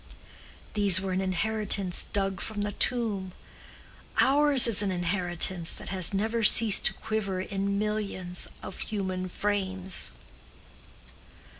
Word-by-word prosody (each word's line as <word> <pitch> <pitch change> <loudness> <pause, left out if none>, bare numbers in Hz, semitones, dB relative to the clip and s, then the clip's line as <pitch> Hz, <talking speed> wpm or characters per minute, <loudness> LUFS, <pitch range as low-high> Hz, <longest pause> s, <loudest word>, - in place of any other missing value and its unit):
These 200 -4 +3
were 190 0 -4
an 185 +1 -1
inheritance 195 0 -1
dug 195 -2 -1
from 215 -2 -5
the 205 - -3
tomb. 205 -7 0 0.9
Ours 285 -1 +6
is 225 -4 +4
an 200 - -1
inheritance 175 -1 -1
that - - -8
has 185 -3 +3
never 220 +4 -1
ceased 220 -1 +5
to - - -2
quiver 215 -4 -3
in 200 +1 -3
millions 200 -4 -3 0.2
of - - -8
human 185 -3 -4
frames." 190 -2 -1
195 Hz, 120 wpm, -27 LUFS, 185-215 Hz, 0.9 s, Ours